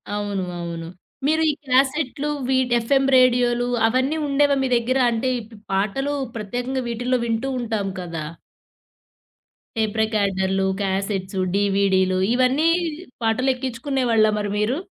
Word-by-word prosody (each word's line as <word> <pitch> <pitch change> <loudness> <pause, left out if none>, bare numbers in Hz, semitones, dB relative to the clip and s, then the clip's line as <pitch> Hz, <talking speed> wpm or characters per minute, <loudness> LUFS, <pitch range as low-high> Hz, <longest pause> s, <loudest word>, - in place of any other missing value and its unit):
అవును, 205 -2 -2 0.2
అవును 170 -1 -5 0.4
మీరు 315 +1 +2
ఈ - - -4
క్యాసెట్లు 275 +2 +1 0.2
విట్ 260 -2 +2
ఎఫ్ఎం 270 +3 +2
రేడియోలు 245 -1 +3 0.2
అవన్నీ 260 +6 +1
ఉండేవా 285 0 +3
మీ 265 - +1
దగ్గర? 255 +3 0
అంటే 240 +3 -1
ఇప్ 220 +1 -15
ఈ - - -27
పాటలు 215 +9 0 0.2
ప్రత్యేకంగా 245 +5 -3
వీటిలో 245 +2 0
వింటూ 230 +3 -1
ఉంటాం 220 -4 -2
కదా! 165 -3 -5 1.5
టేప్ 220 -1 -1
రికార్డర్లు, 195 -3 0 0.2
క్యాసెట్స్, 195 0 -2 0.2
డీవీడీలు 195 -2 +2
ఇవన్నీ 255 +6 +3 0.5
పాటలు 225 +4 +1
ఎక్కించుకునేవాళ్ళా 250 -3 +1
మరి 205 -1 -2
మీరు? 215 +6 0
235 Hz, 120 wpm, -22 LUFS, 200-260 Hz, 1.5 s, రేడియోలు